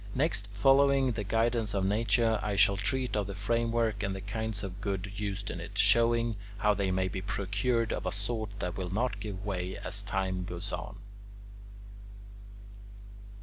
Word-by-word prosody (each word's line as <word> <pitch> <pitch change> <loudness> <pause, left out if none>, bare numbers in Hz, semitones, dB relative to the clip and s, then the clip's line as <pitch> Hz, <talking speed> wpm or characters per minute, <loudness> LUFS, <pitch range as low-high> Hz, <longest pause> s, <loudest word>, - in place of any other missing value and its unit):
Next, 130 -7 +1
following 135 +4 +4
the 110 -2 -3
guidance 115 0 +1
of 95 -1 +1
Nature, 110 +2 +2
I 105 -1 -1
shall 100 0 +5
treat 125 +6 -1
of 105 -2 0
the 100 - -5
framework 115 +1 0
and 95 -1 -1
the 95 - -6
kinds 105 +1 -3
of 95 +1 -6
wood 100 -1 -2
used 100 0 -3
in - - -5
it, - - -8
showing 115 -1 +4 0.2
how 105 0 +3
they 100 -1 0
may 95 0 +1
be 95 0 -4
procured 100 +4 0
of - - -3
a - - 0
sort 110 +1 -2
that 90 -1 -2
will 90 -2 -3
not 105 +2 -1
give 100 -1 -6
way 95 -2 -3
as 100 - -2
time 95 -2 -2
goes 90 +2 -5
on. 105 - -5
105 Hz, 170 wpm, -30 LUFS, 95-115 Hz, 0.2 s, shall